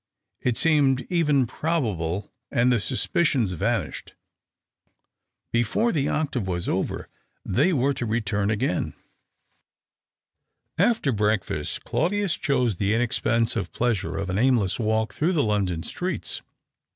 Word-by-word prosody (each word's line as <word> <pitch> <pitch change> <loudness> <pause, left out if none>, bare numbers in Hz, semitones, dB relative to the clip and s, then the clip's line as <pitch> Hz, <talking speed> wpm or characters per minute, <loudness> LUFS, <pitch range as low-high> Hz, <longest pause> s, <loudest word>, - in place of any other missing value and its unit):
It 125 -2 0
seemed 140 -5 +3
even 150 -6 +3
probable, 105 - -2 0.2
and 125 -1 +3
the 120 - +2
suspicions 130 - +1
vanished. 90 - -2 1.4
Before 120 - +2
the 145 -3 0
octave 140 -9 -1
was 90 -2 -2
over - - -2 0.4
they 140 - +2
were 140 -3 +2
to 125 -3 -3
re 110 +2 +1
turn 100 -2 -1
again. 110 +7 -1 1.8
After 225 - +3
breakfast 105 -8 -1
Claudius 195 +1 0
chose 125 -8 0
the 100 +2 +1
inexpen 115 -1 +2
sive - - -3
pleasure 105 -9 0
of 95 -2 -2
an 95 - 0
aimless 115 -6 +2
walk 110 -2 0
through 165 - +1
the 150 -5 +2
London 95 -6 0
streets. - - -3
120 Hz, 125 wpm, -25 LUFS, 100-140 Hz, 1.8 s, seemed